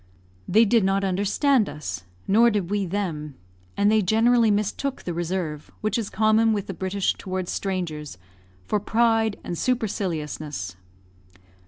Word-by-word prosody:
They 220 +4 +5
did 225 0 +3
not 195 +1 +1
understand 205 +6 +2
us, 150 - -6 0.2
nor 230 +4 +5
did 200 -4 -2
we 205 -2 0
them, 165 -7 -3 0.4
and 205 +1 +4
they 220 0 +4
generally 225 +4 +4
mistook 210 +7 -1
the 175 - -3
reserve 170 -3 -3
which 215 -1 0
is 225 -4 -1
common 220 +1 +3
with 205 -2 -2
the 195 - -5
British 190 +2 -1
towards 185 -1 -4
strangers 160 - -3 0.5
for 210 - 0
pride 225 0 +2
and 175 - -4
superciliousness. 155 - -2
200 Hz, 140 wpm, -24 LUFS, 175-220 Hz, 0.5 s, They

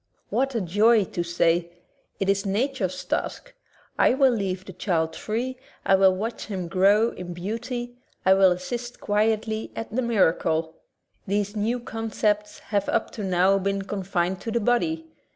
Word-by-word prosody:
What 270 -1 0
a 230 - +1
joy 210 +5 +4
to 175 - -4
say, 170 0 +1 0.5
"It 195 - 0
is 195 0 +2
nature's 210 -1 -1
task. - - -3 0.5
I - - +5
will 270 -1 +5
leave 190 -4 -2
the 190 - -9
child 160 -3 -1
free, 245 +4 -3 0.3
I - - +4
will 190 -1 +5
watch 225 +5 -4
him 190 -5 -4
grow 200 +5 +4
in 175 -1 -7
beauty, 240 +6 -4 0.3
I 190 - +7
will 190 -1 +5
assist 240 +7 -4
quietly 220 +1 0
at 225 -1 -6
the 255 - +2
miracle." 165 -8 +1 0.5
These 205 +1 -1
new 225 +4 0
concepts 215 -2 -1 0.2
have 200 -1 +1
up 225 - 0
to 215 - -6
now 190 +1 +3
been 195 +1 -1
confined 190 -2 -2
to - - -4
the 235 +1 +1
body. 320 +9 +1
205 Hz, 160 wpm, -25 LUFS, 185-230 Hz, 0.5 s, I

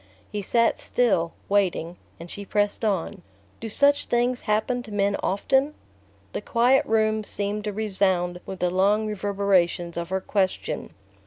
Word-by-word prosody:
He 210 - -3
sat 230 +4 +2
still, 185 -9 +1 0.2
waiting, 185 -4 0 0.2
and 170 +1 -8
she 200 - -6
pressed 205 +2 -1
on: 195 -6 -1 0.4
"Do 225 - -5
such 285 +6 +3
things 245 +1 0
happen 220 +4 +1
to 225 - -11
men 200 0 +1
often?" 270 +9 +1 0.6
The - - -3
quiet 250 +2 +3
room 220 0 +2
seemed 205 +1 -2
to 210 - -1
resound 190 -4 0
with 190 - -7
the 180 -1 +1
long 200 +4 +2
reverberations 195 -4 0
of 170 0 -4
her 190 0 0
question. 190 -1 -2
205 Hz, 150 wpm, -25 LUFS, 190-220 Hz, 0.6 s, such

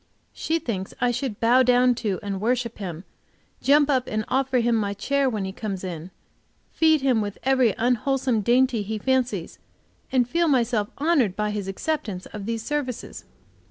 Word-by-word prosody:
She 325 - -1
thinks 200 - -4
I 245 - +2
should 245 -3 -3
bow 240 +3 +5
down 250 0 +4
to 200 -5 -1
and 195 -1 -4
worship 235 0 -1
him, 175 -4 -6 0.6
jump 290 +1 +4
up 260 -3 +1
and 215 0 -2
offer 265 0 +1
him 235 0 +2
my 200 -2 -1
chair 280 +5 +1
when 215 -5 -3
he 190 - -4
comes 195 -2 -5
in, 175 -2 -6 0.6
feed 315 -2 +3
him 255 -5 +2
with 205 -1 -4
every 260 -4 +3
unwholesome 250 0 +1
dainty 245 +1 +2
he 215 +2 -3
fancies, 245 -6 -1 0.5
and 250 -3 +2
feel 335 +6 +1
myself 235 -6 +1
honored 280 - +2
by 210 0 -1
his 205 -2 -4
acceptance 200 - -3
of 205 -1 -8
these 230 -1 -2
services. 280 -3 -4
235 Hz, 170 wpm, -24 LUFS, 205-265 Hz, 0.6 s, bow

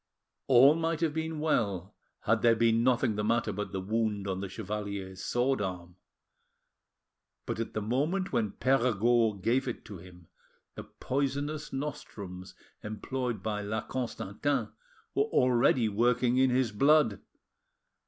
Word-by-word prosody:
All 135 +2 +7
might 165 0 -1
have 160 -3 +1
been 160 0 -3
well 100 - 0 0.3
had 115 +1 +1
there 115 -1 +5
been 115 0 +3
nothing 125 -2 +2
the 105 - -1
matter 115 0 +1
but 105 +2 -4
the 95 - -3
wound 105 0 -1
on 95 -1 -2
the 100 - -5
chevalier's 100 -2 -5
sword 125 0 0
arm. 90 -2 -5 1.5
But - - -4
at 115 - -4
the 110 - -1
moment 155 - -1
when 105 -3 0
Perregaud 120 -5 +2
gave 130 +4 +1
it 125 - -5
to 100 -4 -9
him 90 -1 -15 0.5
the - - -8
poisonous 145 +3 -3
nostrums 100 -10 -6 0.3
employed 115 0 -4
by 105 -1 -2
La 110 +2 -2
Constantin 130 +2 -2 0.4
were 420 - +2
already 125 - +3
working 120 +3 +2
in 130 0 +4
his 125 -2 +1
blood. 140 -1 +3
115 Hz, 140 wpm, -30 LUFS, 105-135 Hz, 1.5 s, All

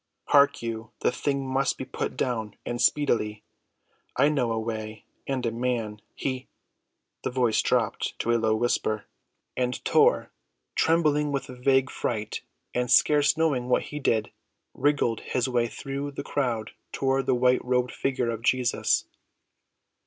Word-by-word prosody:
Hark 140 -4 +5
you, 115 -1 -4
the - - +3
thing 140 +1 -1
must 135 +1 +1
be - - -5
put - - -4
down 110 -5 -2
and 120 0 -3
speedily. 115 -6 +1 0.7
I 140 +3 +5
know 130 -6 +1
a 115 - 0
way 110 -1 -5 0.2
and 130 -2 -1
a 115 - +1
man; 115 -3 -2
he—" 130 -1 -3 0.8
The - - 0
voice 125 -3 +2
dropped - - 0
to 120 - 0
low 110 -1 +2
whispers, 110 -2 0 0.5
and 125 -1 0
Tor, - - +3 0.4
trembling 150 -3 +2
with 140 -1 -2
vague 130 +1 +1
fright, 110 -2 -3 0.3
and 125 0 -1
scarce 150 +2 +5
knowing 140 -7 +1
what - - +3
he 150 - -3
did, 110 -6 +1 0.4
wriggled 145 -6 +1
his 125 -1 -1
way 120 -2 +1
through 140 +4 -5
the 140 - -5
crowd 120 -7 -2 0.2
toward 135 -1 0
the 130 - +3
white‐robed 125 0 +2
figure 130 -3 -1
of 115 -1 -5
Jesus. 125 0 +2
125 Hz, 145 wpm, -26 LUFS, 115-135 Hz, 0.8 s, Hark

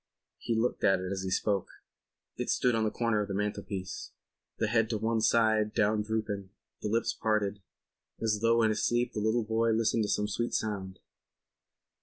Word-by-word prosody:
He 115 - -1
looked 115 +2 0
at 95 -1 +4
it 95 +1 -4
as 95 -1 -2
he 95 - -3
spoke. 100 +1 0 0.7
It - - -4
stood 125 - +2
on 110 -1 +1
the - - +2
corner 115 -2 0
of 105 - -3
the 100 - -3
mantelpiece; 100 -2 -4 0.4
the - - +1
head 115 0 +2
to 110 - 0
one 110 +1 0
side 110 -1 +3
down 105 0 +2
drooping, 105 -3 -3 0.3
the - - -2
lips 115 +2 +1
parted, 105 -2 0 0.6
as 110 -2 0
though 115 0 +4
in 110 - +4
his 110 - -1
sleep 120 +1 +1
the - - -2
little 110 +2 +1
boy 110 +1 +1
listened 115 0 +2
to - - -4
some 105 - +1
sweet 120 +3 -2
sound. 95 -3 -3
110 Hz, 190 wpm, -30 LUFS, 105-115 Hz, 0.7 s, at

